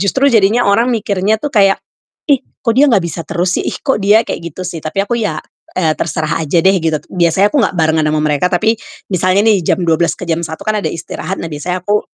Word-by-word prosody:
justru 265 +7 +2
jadinya 225 +3 +3
orang 225 +5 +3
mikirnya 210 -3 0
tuh 290 +2 -4
kayak, 195 -3 +4 0.5
"Ih, 275 -3 +4 0.2
kok 230 - +3
dia 285 +2 +5
nggak 225 -6 +4
bisa 170 0 -4
terus 180 0 0
sih? - - -5
Ih, - - -2
kok 270 -7 0
dia 205 +3 +4
kayak - - -4
gitu 185 - -7
sih?" 170 -2 -5
Tapi 195 +6 -1
aku 240 +3 -2
ya, 210 - -1 0.4
eee, 160 -4 +2
terserah 160 0 -2
aja 155 +3 +1
deh 190 - +6
gitu. 160 -1 0 0.2
Biasanya 180 +3 +3
aku 295 - +2
nggak 195 - -1
barengan 160 -1 +2
ama 150 0 0
mereka, 150 +4 +1
tapi 220 +5 +2 0.4
misalnya 185 +3 +2
nih 215 -4 +4
jam 185 - +1
12 165 +1 +1
ke - - -7
jam 165 0 0
1 160 -1 -6
kan 215 -1 0
ada - - -1
istirahat. 185 +3 -5
Nah 165 - -4
biasanya 180 +5 -4
aku 210 0 +2
190 Hz, 230 wpm, -15 LUFS, 165-215 Hz, 0.5 s, deh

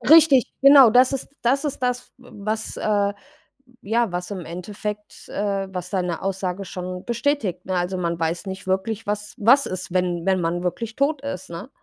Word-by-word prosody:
Richtig, 310 -5 +7
genau, 275 -3 +9
das 250 +4 +5
ist 270 - -3
das 270 +5 +2
ist 290 - -2
das, 250 0 -1
w 250 0 -17 0.2
was, 215 +1 -2
äh 205 -1 +1 0.7
ja, 230 0 +1
was 180 +2 -4
im 190 - -4
Endeffekt, 210 +4 -7
äh 200 -1 -2
was 180 -1 -5
deine 180 -3 -2
Aussage 190 0 -2
schon 180 -1 -6
bestätigt, 235 - -1
ne? 185 - -2
Also, 180 +1 -1
man 170 -1 -1
weiß 165 +4 -2
nicht 190 -1 -6
wirklich, 195 +4 -1
was 210 0 -3
was 255 +6 +5
ist, 185 -1 -5
wenn 180 -1 0
wenn 190 -1 +2
man 175 +1 -1
wirklich 220 +6 -3
tot 280 0 +1
ist, 190 -12 -6
ne? 170 +9 -7
200 Hz, 185 wpm, -23 LUFS, 180-235 Hz, 0.7 s, genau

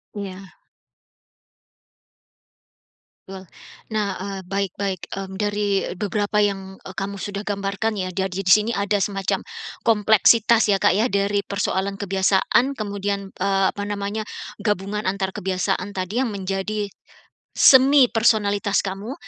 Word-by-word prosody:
Iya. 195 -2 -6 2.8
Betul. 190 0 -9 0.5
Nah, 210 -2 0
eee, 195 +1 -5
baik 195 -1 -1
baik. 190 -3 -2
Mmm, 190 -1 -6
dari 205 -1 0
beberapa 210 +2 0
yang, 195 -2 -2
eee, 190 - -10
kamu 195 0 -4
sudah 200 0 -5
gambarkan 200 +2 -2
ya 185 -3 -3
dari 190 +1 -2
sini 210 +5 +4
ada 200 0 0
semacam 195 0 -1 0.4
kompleksitas 220 0 +4
ya 195 - 0
Kak - - +4
ya 220 - +3
dari 200 -3 0
persoalan 200 0 -2
kebiasaan, 195 +7 +2
kemudian, 200 -3 -3
eee, 195 0 +1
apa 205 - -5
namanya, 205 +1 -3 0.3
gabungan 205 0 -2
antar 190 0 -1
kebiasaan 185 +1 -2
tadi 185 +3 -3
yang 250 -4 0
menjadi 195 +2 -3 0.6
semi 265 -1 +6
personalitas 205 -2 +2
kamu, 200 +5 -5
200 Hz, 120 wpm, -22 LUFS, 195-210 Hz, 2.8 s, semi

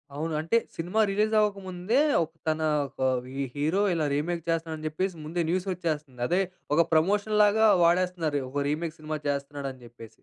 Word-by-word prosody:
అవును. 160 +2 -3
అంటే, 165 +9 +2 0.2
cinema 180 +6 -2
release 215 +2 +1
అవ్వకముందే, 195 +2 0 0.2
ఒక్ 160 +1 -9 0.2
తన 155 0 0 0.3
ఒక 130 +1 -2 0.2
వి 130 +1 -9 0.2
హీరో 160 +8 +1
ఇలా 160 -3 0
రీమేక్ 165 +2 -2
చేస్తున్నాడు 165 -1 -1
అని 155 - -8
చెప్పేసి, 185 +3 -2
ముందే 170 +2 -2
న్యూస్ 185 +2 0
వచ్చేస్తుంది. 150 -7 -4
అదే 180 +3 +2 0.3
ఒక 170 - +6
ప్రమోషన్‌ 205 +6 +2
లాగా 220 +2 +4 0.2
వాడేస్తున్నారు. 170 -4 +2
ఓహో! 140 +2 -2
రీమేక్ 160 +1 -2
సినిమా 155 0 -4
చేస్తున్నాడు 140 0 -3
అని 130 - -18
చెప్పేసి. 115 -2 -12
165 Hz, 170 wpm, -27 LUFS, 150-185 Hz, 0.3 s, ఒక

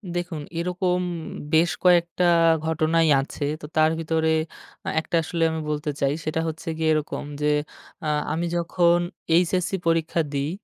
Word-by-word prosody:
দেখুন 175 -3 -3 0.2
এরকম 180 +1 0 0.5
বেশ 165 +2 +4
কয়েকটা 175 0 +3 0.4
ঘটনাই 160 +1 +2
আছে। 140 +2 -6 0.2
তো - - -7
তার 155 0 +4
ভিতরে 160 0 0 0.6
আ - - +1
১ 160 - -6
টা 170 - +3
আসলে 165 +1 -1
আমি 160 0 -3
বলতে 150 0 -2
চাই। 140 -1 +3
সেটা 155 +1 -1
হচ্ছে 160 +1 -6
গিয়ে 160 0 +1
এরকম 155 -1 -2 0.2
যে, 150 - +2 0.6
আ - - -1 0.3
আমি 170 +2 -1
যখন 170 0 +3 0.4
এইচএসসি 180 +2 +2
পরীক্ষা 165 0 +1
দিই। 140 +1 -1
165 Hz, 150 wpm, -24 LUFS, 155-175 Hz, 0.6 s, বেশ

